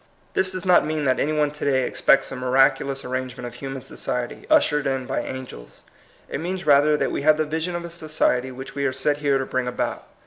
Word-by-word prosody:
This 190 Hz, 0 st, +1 dB
does 185 Hz, -1 st, -5 dB
not 180 Hz, -1 st, +5 dB
mean 155 Hz, -1 st, -2 dB
that 130 Hz, -1 st, +2 dB
any 150 Hz, -, +1 dB
one 150 Hz, -1 st, +1 dB
to 150 Hz, -, -8 dB
day 130 Hz, -2 st, +2 dB
expects 135 Hz, -, +2 dB
a -, -, -4 dB
miraculous 135 Hz, +2 st, +2 dB
ar -, -, -6 dB
rangement 130 Hz, -1 st, -4 dB
of 120 Hz, -, -7 dB
human 135 Hz, -1 st, -6 dB
society, 125 Hz, -1 st, -4 dB
ushered 150 Hz, -, +3 dB
in 135 Hz, -1 st, -1 dB
by 135 Hz, -, -2 dB
angels. 130 Hz, -, -9 dB, 0.4 s
It -, -, -4 dB
means 180 Hz, +3 st, -4 dB
rather 150 Hz, +1 st, +5 dB
that -, -, 0 dB
we -, -, -2 dB
have 155 Hz, +1 st, +4 dB
the 155 Hz, -, +1 dB
vision 160 Hz, +3 st, -2 dB
of 170 Hz, 0 st, -4 dB
a -, -, -6 dB
society 155 Hz, -6 st, 0 dB
which 130 Hz, +2 st, -9 dB
we 140 Hz, 0 st, -2 dB
are 130 Hz, -, -2 dB
set 145 Hz, +3 st, +1 dB
here 145 Hz, -2 st, +2 dB
to 135 Hz, -, -2 dB
bring 130 Hz, -1 st, -2 dB
about. 125 Hz, -, -3 dB
140 Hz, 235 wpm, -23 LUFS, 130-155 Hz, 0.4 s, not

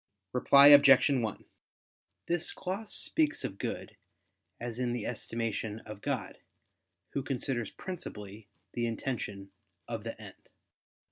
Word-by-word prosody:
Reply 140 Hz, +3 st, +7 dB
Obj. 140 Hz, -1 st, +8 dB
1: 115 Hz, -6 st, -1 dB, 0.8 s
This 170 Hz, -1 st, 0 dB
gloss 195 Hz, +3 st, -5 dB
speaks 310 Hz, -1 st, 0 dB
of 95 Hz, -, -5 dB
good -, -, -5 dB, 0.6 s
as 120 Hz, 0 st, -5 dB
in 125 Hz, -1 st, 0 dB
the 120 Hz, -3 st, -3 dB
estimation 115 Hz, -2 st, -3 dB
of 105 Hz, -1 st, -10 dB
God, -, -, -3 dB, 0.7 s
Who 140 Hz, -, -2 dB
considers 125 Hz, -4 st, -2 dB
principally 105 Hz, -, -8 dB, 0.3 s
the 120 Hz, -1 st, -1 dB
intention 105 Hz, -4 st, -4 dB, 0.4 s
of 115 Hz, -2 st, -5 dB
the 115 Hz, -1 st, -6 dB
end. 105 Hz, -3 st, -13 dB
120 Hz, 120 wpm, -31 LUFS, 110-140 Hz, 0.8 s, Obj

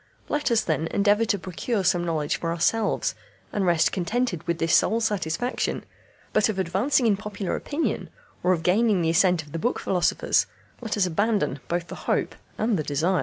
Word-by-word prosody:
Let 295 Hz, -1 st, 0 dB
us, 230 Hz, -2 st, +3 dB
then, 160 Hz, 0 st, -1 dB
endeavour 205 Hz, +5 st, +2 dB
to 205 Hz, -2 st, +1 dB
procure 190 Hz, +4 st, -3 dB
some 175 Hz, -1 st, +2 dB
knowledge 160 Hz, -3 st, -1 dB
for 165 Hz, -, -3 dB
ourselves, 205 Hz, +6 st, +1 dB, 0.4 s
and 195 Hz, -3 st, 0 dB
rest 170 Hz, -2 st, +3 dB
contented 195 Hz, -1 st, -1 dB
with 170 Hz, -1 st, 0 dB
this 165 Hz, 0 st, 0 dB
sole 225 Hz, -, +3 dB
satisfaction; 210 Hz, +1 st, -1 dB, 0.5 s
but 215 Hz, +1 st, +3 dB
of 210 Hz, -, -2 dB
advancing 195 Hz, +9 st, +1 dB
in 215 Hz, -3 st, +4 dB
popular 205 Hz, -2 st, -4 dB
opinion, 300 Hz, +3 st, -2 dB, 0.3 s
or 180 Hz, -, +2 dB
of 165 Hz, -3 st, 0 dB
gaining 200 Hz, +1 st, +3 dB
the 165 Hz, -, +2 dB
assent 175 Hz, -1 st, +3 dB
of 150 Hz, -, -16 dB
the 165 Hz, -, -4 dB
book 240 Hz, -, 0 dB
philosophers, 180 Hz, -3 st, +1 dB, 0.3 s
let 225 Hz, -2 st, -3 dB
us 200 Hz, -, +3 dB
abandon 200 Hz, -, 0 dB
both 175 Hz, 0 st, -1 dB
the -, -, -8 dB
hope -, -, +1 dB, 0.2 s
and 220 Hz, -4 st, +1 dB
the -, -, -1 dB
desire." 165 Hz, +6 st, +1 dB
190 Hz, 185 wpm, -25 LUFS, 170-220 Hz, 0.5 s, in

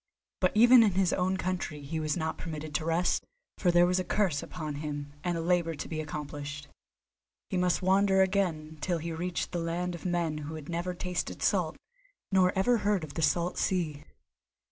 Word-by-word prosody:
But 185 Hz, -, +2 dB
even 240 Hz, +3 st, +8 dB
in 210 Hz, -4 st, +4 dB
his 185 Hz, -1 st, +2 dB
own 185 Hz, +1 st, +1 dB
country 175 Hz, -5 st, -3 dB
he 160 Hz, +3 st, -3 dB
was 155 Hz, 0 st, -1 dB
not 160 Hz, -1 st, -2 dB
permitted 155 Hz, -2 st, -6 dB
to 155 Hz, -, -1 dB
rest, 165 Hz, +2 st, +1 dB, 0.4 s
for 180 Hz, -, +2 dB
there 175 Hz, 0 st, +6 dB
was 180 Hz, +1 st, +2 dB
a -, -, 0 dB
curse 180 Hz, -8 st, +1 dB
upon 155 Hz, -4 st, -5 dB
him 145 Hz, -1 st, -5 dB
and 175 Hz, -1 st, 0 dB
a -, -, -2 dB
labour 170 Hz, -1 st, +1 dB
to 145 Hz, -, -6 dB
be 155 Hz, -1 st, -3 dB
accomplished. 150 Hz, -1 st, -6 dB, 0.8 s
He 185 Hz, -, 0 dB
must 180 Hz, 0 st, +1 dB
wander 190 Hz, +1 st, +4 dB
again 165 Hz, -5 st, -1 dB
till 175 Hz, +3 st, 0 dB
he 165 Hz, +1 st, -4 dB
reached 175 Hz, +2 st, -3 dB
the 175 Hz, -, -2 dB
land 170 Hz, +2 st, -2 dB
of 170 Hz, -, -8 dB
men 170 Hz, -4 st, -1 dB
who 150 Hz, +2 st, -6 dB
had 155 Hz, -1 st, -9 dB
never 175 Hz, +2 st, -2 dB
tasted 180 Hz, -1 st, -3 dB
salt, -, -, +1 dB, 0.5 s
nor 185 Hz, -1 st, +4 dB
ever 240 Hz, +5 st, +4 dB
heard 205 Hz, -4 st, +1 dB
of 150 Hz, -2 st, -7 dB
the 165 Hz, -, -3 dB
salt 170 Hz, +4 st, +1 dB
sea. 160 Hz, -6 st, -1 dB
175 Hz, 195 wpm, -29 LUFS, 155-185 Hz, 0.8 s, even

